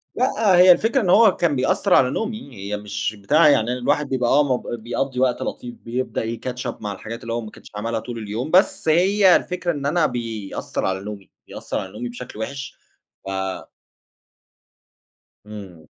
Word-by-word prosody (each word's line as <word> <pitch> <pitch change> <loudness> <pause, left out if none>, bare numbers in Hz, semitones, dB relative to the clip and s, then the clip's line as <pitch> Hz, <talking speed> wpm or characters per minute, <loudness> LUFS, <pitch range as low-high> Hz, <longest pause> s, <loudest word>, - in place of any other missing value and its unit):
لأ 225 -6 +2
هي 180 0 +8
الفكرة 225 +8 +3
إن 185 - -1
هو 215 0 +6
كان 170 -5 +1
بيأثّر 130 0 +1
على 125 - +5
نومي، 215 - -4
هي 100 +1 -4
مش 105 +1 -4
بتاع 150 +10 +4
يعني 120 -4 +3
أنا 125 - -2
الواحد 145 +3 0
بيبقى 125 -2 0
آه 145 +2 +5
مب 130 -3 -1 0.2
بيقضي 125 +2 -2
وقت 125 -1 +1
لطيف، 120 -1 -5
بيبدأ 125 0 -3
ي 115 +1 -4
catch 125 0 -3
up - - -17
مع 105 - -3
الحاجات 115 +4 -8
اللي 115 0 -5
هو 120 - -2
ما 110 -2 -9
كانش - - -15
عملها 115 +2 -2
طول 120 +1 -7
اليوم، 110 +7 -4
بس 190 0 +3
هي 185 +3 +5
الفكرة 180 -1 -1
إن 140 -3 -5
أنا 155 +2 +2
بيأثّر 115 -7 -4
على 95 0 -1
نومي، 100 -2 -8 0.2
بيأثّر - - -5
على 95 - -7
نومي 120 +4 -6
بشكل 120 -2 -9
وحش 135 +4 -6 0.5
ف 95 - -5 2.2
إمم. 95 -7 -10
125 Hz, 185 wpm, -22 LUFS, 110-165 Hz, 2.2 s, هي